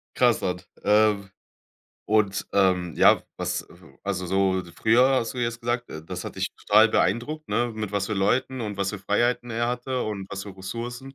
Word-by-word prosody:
krass 120 -2 +3
an. 90 0 -1 0.2
Ähm, 105 -2 +3 0.8
und, 105 -2 +1
ähm, 90 -3 +2
ja, - - +6 0.2
was, - - -2
äh - - -18 0.3
also, 95 -2 -2
so 95 0 +2
d 85 -2 -12
früher 120 +7 +4
hast 115 - -4
du 125 - -7
jetzt 120 0 -2
gesagt, 120 +1 -2
äh, 80 - -8
das - - -6
hat - - -7
dich - - -1
total 110 +2 +5
beeindruckt, 155 +6 0
ne, 120 +3 0
mit 105 -2 -4
was 100 -1 0
für 110 - -3
Leuten 125 +6 +1
und 105 -3 -4
was 100 -1 -1
für 105 - -6
Freiheiten 120 +5 0
er 120 +1 0
hatte 125 +1 -2
und 100 -3 -4
was 100 0 -5
für 100 -2 -9
Ressourcen? 120 +7 -6
105 Hz, 200 wpm, -25 LUFS, 95-120 Hz, 0.8 s, ja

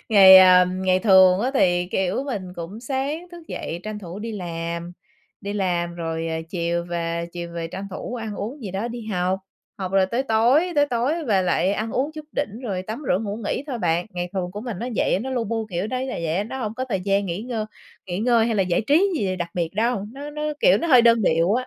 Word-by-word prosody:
Ngày, 195 -4 +9
à, 185 -1 +8
ngày 185 0 +1
thường 190 -2 +6
á 250 +4 0
thì, 175 -7 +3
kiểu, 190 +7 0
mình 200 -10 -5
cũng 175 +6 -7
sáng 280 +7 -3
thức 340 -2 -12
dậy 170 +1 -5
tranh 215 +1 -5
thủ 180 -1 -8
đi 225 +2 -5
làm, 170 -2 -5 0.5
đi 200 - -4
làm 175 -4 -1
rồi, 165 -1 -3
à, 160 0 -2
chiều 170 -1 -1
về, 170 -1 -3
chiều 170 -1 -6
về 165 -1 -3
tranh 190 +4 -6
thủ 215 +5 -6
ăn 225 -3 -5
uống 245 +8 -6
gì 200 - -5
đó 195 +5 -3
đi 235 -2 -7
học, 185 -2 -1 0.4
học 185 -1 -4
rồi 195 -1 +4
tới 235 +7 -1
tối, 265 +9 +3
tới 290 -1 +4
tối 285 +6 -1
về 200 -7 +2
lại 180 +1 +1
ăn 215 +2 -2
uống 280 +4 -1
chút 310 -1 -8
đỉnh 235 -5 -3
rồi 195 -7 -3
tắm 220 +9 -6
rửa 180 - +3
ngủ 205 -1 -4
nghỉ 270 - -2
thôi 260 -5 -4
bạn. 175 -2 0
Ngày 175 -1 -4
thường 185 -2 -2
của 205 +3 -7
mình 230 -6 -5
nó 245 - -3
vậy - - +2
á, - - 0
nó 265 +4 -4
lu 245 -3 -1
bu 225 0 -2
kiểu 180 +2 -2
đấy 255 +3 -3
là - - -4
vậy, 165 +5 0
nó 265 +5 -6
hông 215 -2 -3
có 255 - -3
thời 195 -5 -1
gian 200 +1 +1
nghỉ 175 +3 -3
ngơ 230 -3 -3 0.4
nghỉ 180 0 -3
ngơi 230 0 +3
hay 230 - 0
là 200 - +3
giải 180 -2 +1
trí 330 +8 +4
gì 190 -5 -1
đặc 175 -1 -4
biệt 170 -2 -1
đâu, 220 -1 0
nó 285 +3 -7
nó, 300 0 -6 0.2
kiểu, - - +5
nó 335 - -2
hơi 255 -4 +7
đơn 230 -1 +5
điệu 170 +2 +3
á. 255 +1 -1
200 Hz, 250 wpm, -23 LUFS, 180-240 Hz, 0.5 s, Ngày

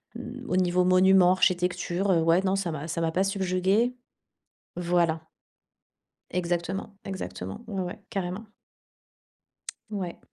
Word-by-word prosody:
hem, - - -7
au - - 0
niveau 180 0 +3
monuments, 185 0 +6
architecture, 180 +1 +1
heu. 165 -2 +4
Ouais, 165 +3 +4
non, 190 0 +2
ça 195 -3 -1
m'a 155 +1 -5
ça 165 +1 -2
m'a 165 0 +1
pas 185 +3 +2
subjuguée 195 +5 +1 0.8
voilà. 170 -2 +2 1.1
Exactement, 180 +3 -2
exactement, 95 - -6
ouais, 195 -3 -3
ouais, 180 +4 -5
carrément. 195 +1 -3 1.5
Ouais. 185 -4 -4
180 Hz, 120 wpm, -27 LUFS, 175-195 Hz, 1.5 s, monuments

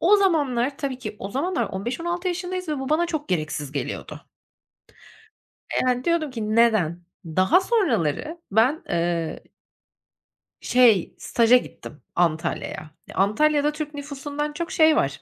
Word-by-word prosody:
o 385 +5 +6
zamanlar 285 -9 +1
tabii 270 -3 -3
ki 250 -4 -7
o 195 - -6
zamanlar 315 - -1
15-16 335 - -3
yaşındayız 360 0 -4
ve 300 -3 -1
bu 265 - -4
bana 330 +3 +2
çok 310 -3 -4
gereksiz 155 -4 -2
geliyordu. 145 - -5 1.5
Eee, - - +2
yani, 250 0 +1
diyordum 335 -4 0
ki 220 -3 -3
"Neden?" 215 -8 +3 0.3
Daha 185 - +3
sonraları 325 - 0
ben 245 - +3
eee 170 -2 -1 1.2
Şey, 235 -7 +4
staja 235 +1 +4
gittim 150 -10 -9
Antalya'ya. 160 -2 -1 0.2
E, - - -11
Antalya'da 290 +9 +2
Türk 300 0 -6
nüfusundan 290 +1 -5
çok 335 +2 -4
şey 315 -1 +5
var; 140 0 0
260 Hz, 135 wpm, -24 LUFS, 195-315 Hz, 1.5 s, o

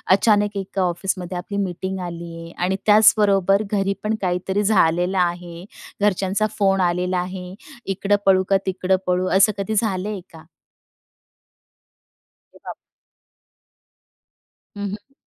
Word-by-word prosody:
अचानक 205 -1 +2
एका 195 0 -3
ऑफिसमध्ये 180 0 -2
आपली 200 +3 -5
मीटिंग 190 +1 -4
आलीये, 170 -1 -8
आणि 185 +2 0
त्याचबरोबर 205 -2 +4
घरी 195 -1 +1
पण 215 +1 0
काहीतरी 190 +2 -1
झालेलं 180 -2 +2
आहे, 175 0 -2 0.4
घरच्यांचा 200 +1 +1
फोन 195 -2 +2
आलेला 180 +1 0
आहे. 180 0 -6 0.3
इकडं 195 +1 0
पळू 190 -1 +4
का, 195 - +4
तिकडं 190 0 0
पळू, 180 0 +1
असं 200 +2 +5
कधी 200 +2 -2
झालं 200 -2 -2
आहे 200 -4 -5
का? 160 0 -13 2.1
अरे - - -19
बाप. - - -6 2.0
हं, 205 - -5
हं. 215 +7 -10
190 Hz, 120 wpm, -21 LUFS, 180-200 Hz, 2.1 s, असं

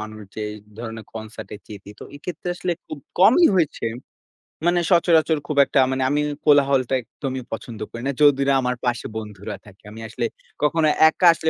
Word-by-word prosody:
মানুষ, 110 0 -8
যে - - -4 0.4
ধরণের 115 -1 -7
concert 110 0 -8
এ - - -6
যেতে। 100 -1 -10
তো - - -7
এক্ষেত্রে 175 +3 -6
আসলে 180 - -1
খুব 155 - -7 0.2
কমই 230 - +7
হয়েছে। 160 -5 0 0.8
মানে 175 0 +3
সচরাচর 165 -2 +4
খুব 150 - -3
একটা 140 - +1
মানে 130 0 0
আমি 145 +1 +1 0.2
কোলাহলটা 140 -3 +4
একদমই 130 +2 -6
পছন্দ 115 -1 -6
করি 115 - -7
না। - - +1
যদি 145 -2 +6
না 140 - +4
আমার 125 0 -1
পাশে 120 -1 -1
বন্ধুরা 105 -1 -6
থাকে। 100 -2 -17
আমি 110 - -10
আসলে 110 - -3 0.4
কখনো 155 +1 +3 0.2
একা 180 - -1
আসলে 160 0 -1
135 Hz, 180 wpm, -22 LUFS, 110-155 Hz, 0.8 s, কমই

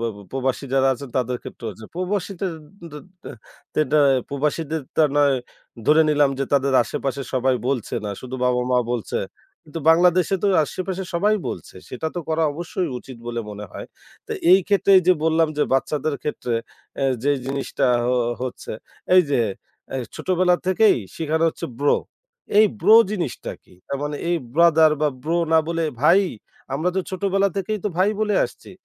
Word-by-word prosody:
বা 115 - -1 0.2
প্রবাসী 130 +1 -2
যারা 135 0 +3
আছেন 140 +2 -7
তাদের 125 -1 0
ক্ষেত্রে - - -10
হচ্ছে। 110 +2 -12
প্রবাসীদের 185 0 -2 0.4
দের 150 +3 -9 0.7
দেটা 155 0 +2 0.3
প্রবাসীদের 150 +2 -2
তা 155 - +5
নয় 145 -1 +4 0.5
ধরে 155 +2 +6
নিলাম 145 -2 +3
যে 135 - 0
তাদের 140 -1 +2
আশেপাশে 135 +4 -3
সবাই 130 0 +2
বলছে 135 -5 -2
না। 105 - -3
শুধু 130 0 -7
বাবা-মা 125 0 +2
বলছে। 120 -3 -2 0.5
কিন্তু 155 +2 -7
বাংলাদেশে 175 +2 +4
তো - - +2 0.2
আশেপাশে 185 +4 -4
সবাই 205 +5 +3
বলছে। - - -7
সেটা 130 +5 -4
তো 175 - -2
করা 160 0 +1
অবশ্যই 175 +3 -3
উচিত 130 0 -11
বলে 120 0 -3
মনে 105 0 -7
হয়। - - -8 0.4
তো - - -4 0.2
এইক্ষেত্রে 195 +2 +4
এইযে 185 0 +4
বললাম 160 0 +3
যে 150 - +2
বাচ্চাদের 140 +3 0
ক্ষেত্রে 125 -5 -3 0.5
এ - - +2 0.2
যে 145 +2 +3
জিনিসটা 135 0 -1 0.3
অ - - +2 0.3
হচ্ছে। 130 -1 -5 0.4
এইযে 145 -8 +4 0.5
এ - - 0 0.2
ছোটবেলা 180 -1 +2
থেকেই 200 +3 +4 0.2
শিখানো 160 0 0
হচ্ছে - - -5
bro। 145 0 +3 0.6
এই 215 - +8
bro 210 +6 +7
জিনিসটা 175 - -4
কি? - - -21
তার 140 - -3
মানে 145 0 -3
এই 175 - +2 0.2
brother 160 -1 +6
বা 155 - +3
bro 165 +4 0
না 160 - +6
বলে 165 -1 -1 0.2
ভাই, 170 +7 +5 0.5
আমরা 155 +6 0
তো - - +3
ছোটবেলা 195 +1 +1
থেকেই 205 +2 -2
তো - - +2
ভাই 190 +3 +3
বলে 210 -1 +1
আসছি। - - -10
155 Hz, 160 wpm, -22 LUFS, 135-180 Hz, 0.7 s, এই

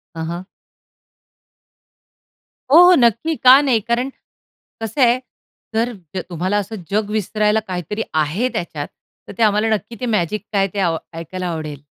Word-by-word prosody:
हां, 160 - -4
हां. 175 +2 -5 2.3
हो, 315 - +8
हो. 360 +1 +8
नक्की, 240 +6 +2
का 260 +1 +7
नाही? 260 -6 +2
कारण 240 +5 -1 0.7
कसं 225 +5 -3
आहे, 245 +1 +5 0.6
जर 235 +2 +1 0.4
तुम्हाला 185 +4 -1
असं 205 +2 -3 0.2
जग 210 0 0
विसरायला 215 +1 +1
काहीतरी 185 +4 -3
आहे 160 +11 0
त्याच्यात, 150 -4 -4 0.4
तर - - -8
ते 230 - +2
आम्हाला 210 +1 +3
नक्की, 220 +3 -7
ते - - -1
मॅजिक 210 -2 -1
काय, 195 -1 +2
ते 200 - -3
अ 170 -3 +1 0.2
ऐकायला 185 +2 -5
आवडेल. 155 -4 -5
210 Hz, 145 wpm, -19 LUFS, 180-235 Hz, 2.3 s, हो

